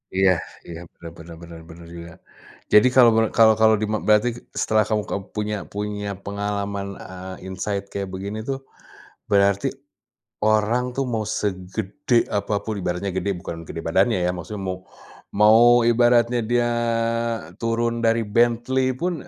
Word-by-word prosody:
Iya 95 -1 +4 0.4
iya, 85 -1 -8
bener 85 -1 -11
bener 85 0 -11
bener 85 -1 -11
bener 85 +1 -12
juga. 85 0 -9 0.6
Jadi 105 +4 +7
kalau, 120 -3 +8
men 115 - +4
kalau 110 -1 +7
kalau 110 0 +6
dima 110 0 -1
berarti 105 +3 +4 0.3
setelah 110 0 +2
kamu 105 -2 0
keb 100 - -3
punya 105 0 -2 0.2
punya 105 0 -4 0.2
pengalaman, 100 0 -3
eee, 95 0 -9
insight 100 +1 -3
kayak 100 -1 -4
begini 100 +3 -5
tuh, 135 -1 -2 0.7
berarti 100 0 +3 0.8
orang 110 +3 +2
tuh 135 - 0
mau 110 - 0 0.2
segede 105 +6 -1
apa 100 +1 -2
pun, 110 - -2
ibaratnya 90 +3 -2
gede, 95 +2 -2
bukan 85 -2 -7
gede 80 - -6
badannya 95 +5 +2
ya 90 - +1
maksudnya 90 +4 -7
mau 90 - -3 0.6
mau 105 +2 +6 0.3
ibaratnya 120 0 +3
dia 120 0 +2 0.9
turun 115 0 0
dari 115 0 +3
Bentley 120 +4 +1
pun, 175 +6 -1
105 Hz, 145 wpm, -22 LUFS, 95-115 Hz, 0.9 s, kalau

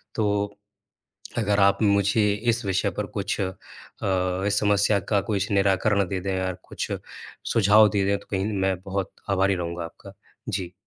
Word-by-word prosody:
तो 105 -1 0 0.8
अगर 105 -2 +2
आप 100 0 +4
मुझे 100 +1 +3 0.3
इस 115 -1 -1
विषय 95 -1 +1
पर - - -1
कुछ - - -2
अ, 95 -1 -1 0.9
इस 100 0 +2
समस्या 100 0 +3
का 100 -2 +3
कुछ 105 0 -1
निराकरण 100 +1 +3
दे 95 -1 -2
दें 95 0 -2
या 95 0 -1 0.2
कुछ - - -4 0.6
सुझाव 105 0 +6
दे 100 -2 +1
दें 100 - +2
तो - - -18
कहीं 100 +2 -1
मैं 95 -2 +1
बहुत 95 0 -3 0.2
आभारी 95 0 +3
रहूँगा 85 -1 -4
आपका। 80 - -11 0.4
जी। 90 -2 -3
100 Hz, 160 wpm, -25 LUFS, 95-105 Hz, 0.9 s, सुझाव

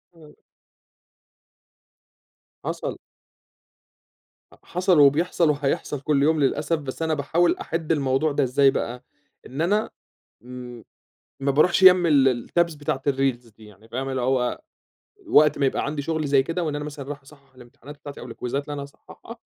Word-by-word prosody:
آه. 155 -2 -16 2.3
حصل. - - -4 1.7
حصل، 180 -2 +1
وبيحصل، 155 +3 +3
وحيحصل 140 -1 -1
كل 140 -1 +1
يوم 155 0 +2
للأسف، 150 +4 +1
بس 140 +2 -7
أنا 160 -1 0
باحاول 165 +4 +1
أحدّ 165 -1 -3
الموضوع 140 0 +1
ده 140 0 +1
إزاي 135 +2 +3
بقى، 125 0 -4 0.4
إن 135 +5 -5
أنا 205 +6 +1 0.5
م 125 -1 -10 0.6
ما 140 0 +1
باروحش 175 +6 +3
جنب 180 -1 +8
ال 135 -6 +3
الtabs 170 -3 +1
بتاعة 140 -2 -3
الreels 125 -5 -2
دي 110 - -15
يعني 105 +2 -18
فاهم 135 +3 -4
اللي 130 -1 -2
هو 125 -1 0 0.7
وقت 150 - +5
ما 140 - +1
يبقى - - 0
عندي 145 0 -3
شغل 155 +1 -2
زي 135 -1 +3
كده، 170 +4 -3
وإن 150 -2 -2
أنا 145 0 -4
مثلًا 145 -2 -8
رايح 145 -1 -6
أصحّح 135 -1 -20
الامتحانات 125 +4 -14
بتاعتي 145 -1 -10
أو - - -9
الكويزات 125 +3 -4
اللي 145 - -7
أنا 140 - -5
هاصحّحها، 140 - -13
140 Hz, 155 wpm, -23 LUFS, 130-155 Hz, 2.3 s, جنب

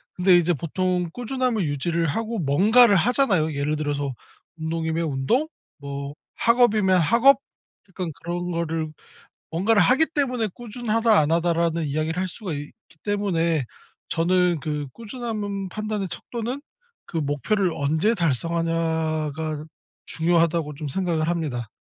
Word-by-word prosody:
근데 180 0 +5
이제 175 0 +2
보통 180 +3 -1
꾸준함을 245 -3 -1
유지를 165 +4 -1
하고 225 +8 -2
뭔가를 205 - +5
하잖아요. 195 - +2
예를 145 +2 -1
들어서 145 -2 -2 0.4
운동이면 160 +1 -2
운동, 150 - +1 0.3
뭐 140 0 -6 0.2
학업이면 220 -5 +4
학업 235 - +5 0.5
약간 180 -3 -4
그런 175 +1 -3
거를 165 -2 -2 0.7
뭔가를 200 +6 +3
하기 270 +6 +4
때문에 250 -6 0
"꾸준하다, 230 -1 +1
안 150 0 +2
하다."라는 170 -1 +1
이야기를 155 +4 -1
할 190 - 0
수가 185 -1 -5
있기 145 0 -6 0.3
때문에 170 -7 0 0.4
저는 175 0 +2
그 150 -2 -3
꾸준함은 215 -4 -4
판단의 215 0 -3
척도는 240 +8 -5 0.5
그 - - -7
목표를 160 +7 0
언제 155 +10 +1
달성하냐가 160 - -1 0.4
중요하다고 165 -2 +1
좀 150 +1 -5
생각을 165 0 -1
합니다. 145 -9 -2
170 Hz, 305 characters per minute, -24 LUFS, 155-215 Hz, 0.7 s, 근데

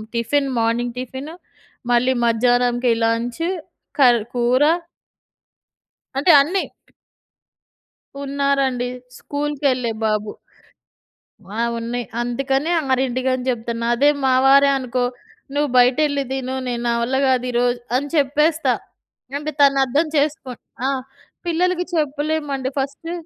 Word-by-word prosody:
Tiffin 270 +4 0
morning 235 +1 0
tiffin, 265 +5 -7 0.6
మళ్ళీ 250 +2 +3
మధ్యాహ్నంకి 245 +1 +2
lunch 235 +5 -1 0.6
కర్ 245 -3 +6 0.2
కూర. 245 +2 +2 1.6
అంటే 320 +5 +3
అన్ని. 360 +7 +1 1.6
ఉన్నారండి. 275 -3 0 0.3
స్కూల్‌కెళ్ళే 280 -5 -1
బాబు. 215 -1 0 1.3
ఆ! - - +1 0.2
ఉన్నాయి. 235 +1 -3 0.2
అందుకని 270 +5 -1 0.2
6కి 255 0 0
అని 255 -1 -4
చెప్తున్నా. 230 -1 -3
అదే 280 +5 +3 0.2
మా 260 - +3
వారే 280 +1 +6
అనుకో, 255 -1 -2 0.5
"నువ్వు 290 0 +1
బయటెళ్లి 280 +3 +3
తిను. 260 -1 -3
నేను 240 -1 -3
నా - - +2
వల్ల 260 +3 0
కాదు 255 -1 +2
ఈరోజు" 245 0 +1 0.2
అని 285 +2 -1
చెప్పేస్తా. 300 +3 +2 0.6
అంటే 300 +1 -4
తను 275 -1 +5
అర్థం 290 +6 +1
చేసుకుం 285 -4 -1 0.3
ఆ! - - +2 0.6
పిల్లలకి 360 +1 +1
చెప్పలేమండి. 295 -3 -1
ఫస్ట్ 280 +5 -4
260 Hz, 105 wpm, -20 LUFS, 245-285 Hz, 1.6 s, కర్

